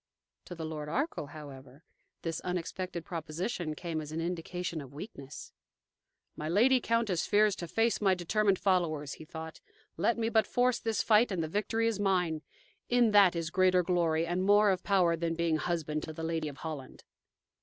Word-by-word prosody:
To 175 - -8
the 165 -1 -5
Lord 155 -1 -5
Arkell, 270 - -2
however, 140 -1 -11 0.4
this 165 -1 -2
unexpected 180 0 -4
proposition 165 +1 -4
came 165 -1 -4
as 150 -1 -8
an 160 - -3
indication 170 0 -3
of 140 0 -12
weakness. 145 -5 -9 0.8
"My 155 +1 -4
lady 245 +8 +4
countess 230 -8 0
fears 210 -1 +4
to 170 - -5
face 225 +6 +1
my 190 -2 +4
determined 195 +3 +1
followers," 160 -8 0
he 155 - -11
thought. 160 0 -8 0.4
"Let 230 +9 +2
me 225 -1 0
but 220 -2 +3
force 245 0 +2
this 225 -2 -1
fight 220 +1 +4
and 175 -4 -1
the - - -2
victory 210 +6 0
is 225 -3 0
mine. 180 -6 +1 0.5
In 240 -2 +4
that 200 -4 +6
is 165 0 -3
greater 185 -1 +4
glory 165 -2 +1
and 175 +2 -1
more 205 +1 +5
of 185 -1 -1
power 180 -4 +3
than 165 0 -2
being 165 -1 +1
husband 155 -2 -2
to 155 - -6
the 160 - -7
Lady 160 -1 -1
of 145 -1 -7
Holland." 150 -5 -7
175 Hz, 180 wpm, -31 LUFS, 160-205 Hz, 0.8 s, that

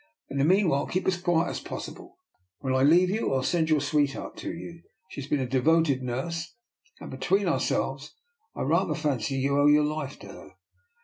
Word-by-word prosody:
In 140 - -2
the - - +3
meanwhile 165 -4 +3
keep 185 - -2
as 180 -2 0
quiet 175 -2 +1
as - - -4
possible. 370 0 -8 0.4
When 130 +1 -2
I 130 - +2
lefave 175 +6 +5
you, 205 -10 0
I'll 130 - 0
send 160 +2 +1
your 155 -1 +4
sweetheart 145 -1 -1
to - - -5
you; 170 0 -9 0.3
ishe - - -11
has 135 - -8
been 145 - 0
a 130 - -1
devoted 140 +2 +2
nurse, 135 +7 -4 0.4
and - - -9
between 180 +10 0
cour 165 -7 +1
selves 135 +3 -2 0.4
I - - -3
rather - - +1
fancy 135 -6 -1
you 140 +1 +1
owe 145 - +5
your 150 0 +5
lifet 150 -2 -4
to - - -10
her." - - -12
150 Hz, 200 wpm, -27 LUFS, 135-170 Hz, 0.4 s, lefave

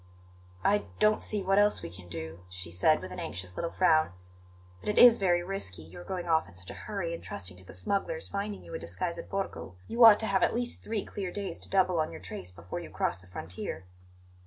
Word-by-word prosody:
"I 205 +1 +3
don't 215 0 +4
see 210 -2 0
what 195 +1 +4
else 205 0 +4
we 85 - -6
can 90 0 -12
do," 80 0 -6
she 95 -2 -8
said, 155 - +3
with 95 - -7
an 90 - -6
anxious 90 0 -5
little 170 - -2
frown; 160 - +3 0.7
"but - - -5
it 210 - 0
is 240 -1 +9
very 175 -3 +3
risky, 175 - -5
your 90 +2 -11
going 180 - -4
off 160 -1 +2
in - - -17
such 90 0 -8
a - - -10
hurry 195 -5 -2
and 170 - -6
trusting 90 -2 -3
to 90 - -11
the - - -12
smugglers 200 - -2
finding 200 0 -4
you - - -11
a 485 - -3
disguise - - -3
at - - -8
Borgo. 195 - -4
You 235 +1 +3
ought 220 -2 +11
to - - -1
have 195 -2 +2
at - - +3
least 240 0 -1
three 215 -2 -2
clear 195 -3 -4
days 200 +1 -4
to - - -7
double 185 -3 +3
on 155 - +1
your - - -8
trace 90 0 -6
before 90 -1 -7
you - - -8
cross - - -1
the 90 - -18
frontier." 90 +1 -6
170 Hz, 235 wpm, -30 LUFS, -, 0.7 s, ought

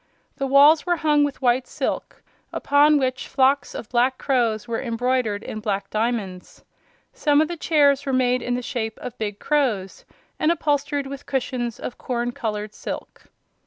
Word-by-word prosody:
The 275 - -1
walls 290 +3 +6
were 350 -1 +1
hung 300 -2 +2
with 285 -2 -3
white 250 +1 +2
silk, - - -4 0.3
upon 295 +1 +4
which 260 -2 -1
flocks 270 +1 +2
of 225 - -6
black 250 +2 +2
crows 240 -4 0
were 230 -1 -2
embroidered 235 -3 -1
in 215 - -6
black 200 -2 -3
diamonds. 215 -5 -3 0.5
Some 290 -2 +2
of 310 - +3
the 345 - -4
chairs 285 -4 +3
were - - +1
made 255 -1 +2
in 245 - -1
the 250 - -3
shape 225 -4 -3
of 245 - -7
big 205 -2 -3
crows 235 -12 -1 0.4
and 310 - +3
upholstered 290 -3 0
with 275 0 -8
cushions 250 -3 -2
of 245 - -7
corn 245 -1 -2
colored 210 -3 -4
silk. - - -8
255 Hz, 165 wpm, -23 LUFS, 230-285 Hz, 0.5 s, walls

